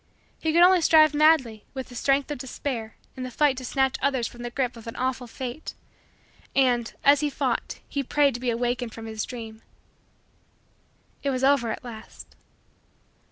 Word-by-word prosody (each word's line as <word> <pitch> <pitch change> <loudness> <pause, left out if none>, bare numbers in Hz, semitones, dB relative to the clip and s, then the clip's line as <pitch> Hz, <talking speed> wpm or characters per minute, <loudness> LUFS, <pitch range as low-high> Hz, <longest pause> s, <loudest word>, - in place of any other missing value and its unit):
He 320 - 0
could 340 +2 +6
only 365 0 +6
strive 310 -2 +6
madly, 290 -8 +3
with 265 -1 -5
the - - -12
strength 275 +3 +1
of 290 - -4
despair, 245 -3 -5 0.2
in 260 - -7
the 255 - -4
fight 280 +2 +2
to 255 - -6
snatch 265 +1 0
others 265 -4 +1
from 240 - -11
the 240 - -4
grip 250 0 -2
of 230 -1 -12
an 230 - -6
awful 255 -1 -2
fate; 255 +4 -6 0.8
and, 245 -3 +2
as 280 0 +6
he 300 0 0
fought, - - -2
he 280 - -2
prayed 280 +1 +2
to 240 - -5
be 250 0 -1
awakened 240 0 -2
from 225 - -8
his 220 -1 -4
dream. 225 -3 -8 1.6
It 280 - -1
was 260 -1 -1
over 270 -4 +3
at - - -4
last. 225 -2 -11
255 Hz, 180 wpm, -25 LUFS, 240-280 Hz, 1.6 s, could